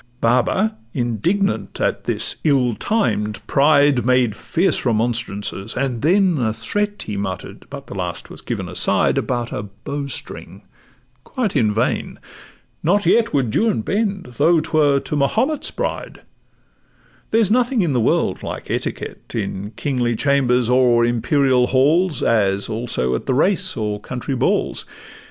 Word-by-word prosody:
Baba, 130 Hz, -, +1 dB, 0.2 s
indignant 140 Hz, -, -1 dB
at -, -, -1 dB
this -, -, -1 dB
ill 135 Hz, -6 st, +2 dB
timed 105 Hz, -, -1 dB
pride, 140 Hz, -2 st, +4 dB
Made 125 Hz, -4 st, +2 dB
fierce 175 Hz, -, 0 dB
remonstrances, 115 Hz, -3 st, -1 dB
and 125 Hz, -3 st, -1 dB
then 180 Hz, -1 st, +3 dB
a 110 Hz, -3 st, 0 dB
threat 205 Hz, -, -2 dB
He 105 Hz, -2 st, -5 dB
mutter'd 95 Hz, -2 st, -6 dB
(but -, -, -8 dB
the -, -, -9 dB
last -, -, -4 dB
was -, -, -10 dB
given -, -, -4 dB
aside) -, -, +2 dB
About 120 Hz, -2 st, -2 dB
a -, -, -3 dB
bow 110 Hz, +8 st, -6 dB
string—quite 130 Hz, -, -7 dB
in 110 Hz, -2 st, +3 dB
vain; 115 Hz, +4 st, -1 dB, 0.6 s
not 200 Hz, +5 st, +2 dB
yet 225 Hz, +6 st, +3 dB
Would 130 Hz, -6 st, 0 dB
Juan 220 Hz, -, +2 dB
bend, 195 Hz, -, -2 dB
though 170 Hz, 0 st, +4 dB
'twere 150 Hz, -3 st, +2 dB
to -, -, -4 dB
Mahomet's 225 Hz, -, 0 dB
bride: -, -, -5 dB, 1.1 s
There's 220 Hz, -2 st, +2 dB
nothing 245 Hz, -2 st, +2 dB
in 160 Hz, -5 st, 0 dB
the 125 Hz, -, +1 dB
world -, -, +1 dB
like -, -, -6 dB
etiquette -, -, -5 dB
In 100 Hz, -2 st, -3 dB
kingly 125 Hz, -3 st, -1 dB
chambers 125 Hz, -2 st, +2 dB
or 125 Hz, -1 st, +4 dB
imperial 125 Hz, +2 st, +2 dB
halls, 150 Hz, +5 st, +2 dB
As 100 Hz, -3 st, +1 dB
also 110 Hz, -, -1 dB
at 65 Hz, -, -3 dB
the 130 Hz, -, +1 dB
race 185 Hz, +4 st, +1 dB
and 105 Hz, -2 st, -3 dB
county 130 Hz, +4 st, -5 dB
balls. 130 Hz, -, 0 dB
130 Hz, 140 wpm, -20 LUFS, 115-175 Hz, 1.1 s, pride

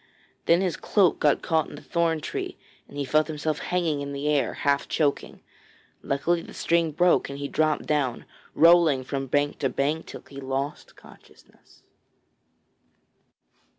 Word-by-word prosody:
Then 170 Hz, +2 st, +5 dB
his 185 Hz, -4 st, -1 dB
cloak 195 Hz, -5 st, +2 dB
got 145 Hz, -2 st, +2 dB
caught 160 Hz, -1 st, +1 dB
in 145 Hz, -, -10 dB
a -, -, -11 dB
thorn 165 Hz, -2 st, 0 dB
tree -, -, -5 dB, 0.3 s
and -, -, -12 dB
he 140 Hz, -, -2 dB
felt 155 Hz, +4 st, +2 dB
himself 155 Hz, -1 st, -3 dB
hanging 165 Hz, -5 st, -1 dB
in 140 Hz, 0 st, -5 dB
the 140 Hz, +1 st, -3 dB
air, 145 Hz, -2 st, +1 dB
half 140 Hz, 0 st, 0 dB
choking. 145 Hz, -3 st, -1 dB, 0.6 s
Luckily 165 Hz, +5 st, 0 dB
the -, -, -12 dB
string 170 Hz, -1 st, +1 dB
broke 175 Hz, +1 st, +2 dB
and 140 Hz, -, -6 dB
he 140 Hz, 0 st, -4 dB
dropped 155 Hz, +1 st, 0 dB
down, 140 Hz, -5 st, -1 dB, 0.3 s
rolling 165 Hz, -5 st, +5 dB
from 135 Hz, +1 st, -4 dB
bank 145 Hz, +2 st, 0 dB
to 135 Hz, -, 0 dB
bank 150 Hz, +5 st, -1 dB
till -, -, -9 dB
he 140 Hz, 0 st, -10 dB
lost 135 Hz, +2 st, -4 dB
consciousness. -, -, -20 dB
150 Hz, 155 wpm, -25 LUFS, 140-165 Hz, 0.6 s, Then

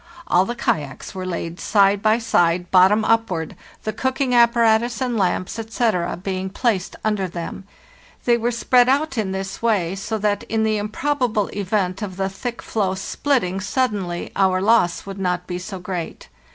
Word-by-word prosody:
All 180 Hz, +2 st, +3 dB
the 240 Hz, -, -4 dB
kayaks 145 Hz, -, -2 dB
were 185 Hz, -1 st, -5 dB
laid 170 Hz, -1 st, -4 dB
side 200 Hz, 0 st, +3 dB
by 215 Hz, +1 st, +3 dB
side 175 Hz, -6 st, +1 dB
bottom. 195 Hz, +4 st, +5 dB
upward, 190 Hz, -8 st, +1 dB
70 -, -, -15 dB
FARTHEST -, -, -22 dB
NORTH -, -, -26 dB
the 215 Hz, 0 st, -5 dB
cooking 260 Hz, -1 st, 0 dB
apparatus 235 Hz, -1 st, +4 dB
and 250 Hz, -2 st, -1 dB
lamps, 190 Hz, +1 st, -1 dB
etc., 220 Hz, -6 st, -1 dB
being 190 Hz, +1 st, -3 dB
placed 200 Hz, -3 st, -1 dB
under 210 Hz, -3 st, 0 dB
them. 175 Hz, +2 st, -6 dB, 0.6 s
They 240 Hz, -, +5 dB
were 235 Hz, 0 st, 0 dB
spread 245 Hz, +1 st, +3 dB
out 275 Hz, -2 st, +1 dB
in 195 Hz, -3 st, -1 dB
this 190 Hz, 0 st, -5 dB
way, 200 Hz, -7 st, +1 dB
so 200 Hz, +3 st, -3 dB
that 205 Hz, -1 st, 0 dB
in 220 Hz, -1 st, 0 dB
the 215 Hz, -1 st, +1 dB
improbable 225 Hz, 0 st, -1 dB
event 195 Hz, -1 st, -1 dB
of 190 Hz, -3 st, -5 dB
the 195 Hz, 0 st, -1 dB
thick 235 Hz, +5 st, -6 dB
floe 195 Hz, -4 st, -1 dB
splitting 195 Hz, -1 st, -1 dB
suddenly 205 Hz, -7 st, -2 dB
our 190 Hz, -1 st, +3 dB
loss 200 Hz, -3 st, +2 dB
would 195 Hz, 0 st, -7 dB
not 180 Hz, -2 st, -1 dB
be 180 Hz, 0 st, -4 dB
so 190 Hz, +1 st, -6 dB
great. 180 Hz, -, -6 dB
205 Hz, 180 wpm, -21 LUFS, 185-230 Hz, 0.6 s, bottom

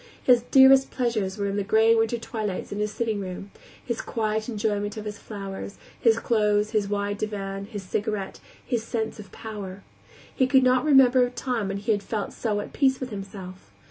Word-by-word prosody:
His 245 Hz, -2 st, +5 dB
dearest 265 Hz, 0 st, +7 dB
pleasures 220 Hz, -6 st, -1 dB
were 200 Hz, -1 st, -1 dB
the 200 Hz, 0 st, -1 dB
gray 220 Hz, +3 st, +4 dB
winter 225 Hz, +1 st, +1 dB
twilights 215 Hz, -4 st, -4 dB
in 205 Hz, -, -4 dB
his 210 Hz, 0 st, -1 dB
sitting 220 Hz, -1 st, -2 dB
room; 190 Hz, +1 st, -6 dB, 0.3 s
his 235 Hz, -2 st, -2 dB
quiet 220 Hz, 0 st, -2 dB
enjoyment 205 Hz, -1 st, -2 dB
of 215 Hz, -, -6 dB
his 210 Hz, -1 st, -6 dB
flowers, 200 Hz, -1 st, -7 dB, 0.2 s
his 230 Hz, -1 st, +4 dB
clothes, 210 Hz, -2 st, +1 dB
his 210 Hz, -3 st, 0 dB
wide 205 Hz, 0 st, -2 dB
divan, 195 Hz, -2 st, -4 dB
his 205 Hz, -2 st, -7 dB
cigarette, 200 Hz, +1 st, -3 dB
and -, -, -24 dB
his 235 Hz, -3 st, +1 dB
sense 225 Hz, -1 st, -3 dB
of 200 Hz, -3 st, -11 dB
power. 200 Hz, -3 st, -8 dB, 0.5 s
He 260 Hz, -, +3 dB
could 265 Hz, 0 st, +5 dB
not 255 Hz, +1 st, +3 dB
remember 265 Hz, -3 st, +6 dB
a 245 Hz, -, +1 dB
time 240 Hz, -3 st, -2 dB
when 195 Hz, 0 st, -3 dB
he 210 Hz, +3 st, -1 dB
had 205 Hz, -1 st, +1 dB
felt 210 Hz, -1 st, -4 dB
so 210 Hz, -3 st, -1 dB
at -, -, -9 dB
peace 265 Hz, -2 st, +2 dB
with 255 Hz, -2 st, -5 dB
himself. 195 Hz, -, -8 dB
215 Hz, 195 wpm, -25 LUFS, 200-235 Hz, 0.5 s, dearest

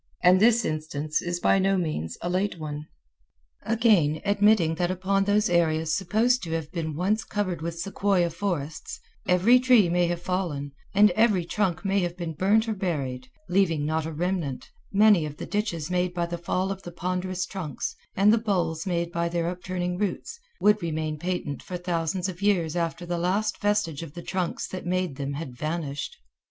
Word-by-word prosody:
And 180 Hz, +1 st, +6 dB
this 235 Hz, +3 st, +4 dB
instance 155 Hz, -1 st, -2 dB
is 175 Hz, 0 st, -3 dB
by 195 Hz, -, +3 dB
no 195 Hz, 0 st, +2 dB
means 155 Hz, -, -2 dB
a -, -, -1 dB
late 185 Hz, +1 st, 0 dB
one. 150 Hz, -1 st, -6 dB, 0.7 s
Again, 210 Hz, -9 st, +3 dB
admitting 205 Hz, -4 st, +4 dB
that 175 Hz, +1 st, 0 dB
upon 195 Hz, +2 st, +1 dB
those 205 Hz, +1 st, +3 dB
areas 160 Hz, -2 st, +2 dB
supposed 220 Hz, +6 st, +2 dB
to 165 Hz, -3 st, -4 dB
have 160 Hz, -2 st, -3 dB
been 160 Hz, -3 st, -3 dB
once 200 Hz, +7 st, +1 dB
covered 185 Hz, -6 st, -2 dB
with 170 Hz, +1 st, -4 dB
sequoia 185 Hz, -1 st, +1 dB
forests, 165 Hz, -4 st, -4 dB, 0.3 s
every 190 Hz, +8 st, +5 dB
tree 250 Hz, -7 st, +5 dB
may 175 Hz, 0 st, +2 dB
have 175 Hz, 0 st, -1 dB
fallen, 175 Hz, -6 st, -2 dB, 0.2 s
and 210 Hz, 0 st, +7 dB
every 205 Hz, -3 st, +3 dB
trunk 190 Hz, -1 st, -1 dB
may 195 Hz, +1 st, +2 dB
have 175 Hz, -1 st, -2 dB
been 170 Hz, -2 st, -4 dB
burned 210 Hz, +7 st, +2 dB
or 220 Hz, -, 0 dB
buried, 140 Hz, -10 st, -3 dB, 0.2 s
leaving 175 Hz, -5 st, +2 dB
not 160 Hz, +1 st, -1 dB
a -, -, -4 dB
remnant, 165 Hz, -4 st, -3 dB, 0.2 s
many 205 Hz, -3 st, +5 dB
of 150 Hz, -1 st, -6 dB
the -, -, -5 dB
ditches 180 Hz, -6 st, -2 dB
made 180 Hz, 0 st, 0 dB
by 175 Hz, -1 st, 0 dB
the 170 Hz, 0 st, -4 dB
fall 185 Hz, +3 st, -1 dB
of 195 Hz, -1 st, -5 dB
the 175 Hz, -, -8 dB
ponderous 180 Hz, +1 st, -2 dB
trunks, 175 Hz, -7 st, -5 dB, 0.2 s
and 205 Hz, +3 st, +5 dB
the 230 Hz, -, +3 dB
bowls 175 Hz, -6 st, -1 dB
made 170 Hz, -1 st, -1 dB
by 170 Hz, 0 st, -1 dB
their 170 Hz, -1 st, -1 dB
upturning 180 Hz, 0 st, -3 dB
roots, 210 Hz, -, -3 dB, 0.2 s
would 210 Hz, 0 st, +4 dB
remain 155 Hz, -2 st, -2 dB
patent 175 Hz, -4 st, -3 dB
for 180 Hz, -, -5 dB
thousands 175 Hz, +1 st, -1 dB
of 185 Hz, 0 st, -7 dB
years 175 Hz, -6 st, +2 dB
after 170 Hz, 0 st, -2 dB
the 175 Hz, 0 st, -2 dB
last 200 Hz, +5 st, 0 dB
vestige 205 Hz, -8 st, 0 dB
of 165 Hz, -4 st, -8 dB
the 175 Hz, -, -7 dB
trunks 185 Hz, -3 st, -2 dB
that 185 Hz, -, -6 dB
made 180 Hz, -5 st, -1 dB
them 140 Hz, 0 st, -3 dB
had 140 Hz, -4 st, -6 dB
vanished. 155 Hz, -1 st, -4 dB
175 Hz, 185 wpm, -26 LUFS, 160-195 Hz, 0.7 s, and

